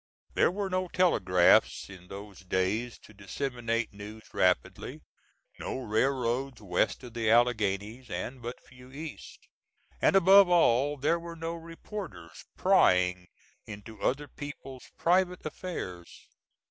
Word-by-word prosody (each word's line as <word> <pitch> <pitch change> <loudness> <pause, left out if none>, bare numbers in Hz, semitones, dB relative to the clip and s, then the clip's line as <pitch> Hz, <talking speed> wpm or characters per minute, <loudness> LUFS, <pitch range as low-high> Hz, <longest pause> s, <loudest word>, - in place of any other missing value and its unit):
There - - +4
were 200 +3 -2
no 185 0 -1
telegraphs 95 - +3
in 90 -2 -13
those 100 +1 -9
days 95 +6 -1
to 105 - -15
disseminate 115 +2 -3
news 105 +2 -10
rapidly, 90 -1 0 0.6
no - - -4
railroads 130 +2 0
west 100 +5 0
of 120 -2 -10
the 115 -2 0
Alleghanies, 115 0 +1
and 125 0 -5
but 120 +2 -6
few 125 0 -16
east; 150 +2 -9 0.5
and - - +4
above 195 0 +7
all, 145 -4 +3
there 150 +5 +1
were 170 0 -8
no 165 0 -4
reporters 165 - -9
prying 90 0 +3 0.4
into 105 0 -10
other 145 +3 0
people's 135 -2 -9
private 180 +1 +2
affairs. 95 - -7
125 Hz, 120 wpm, -29 LUFS, 105-160 Hz, 0.6 s, above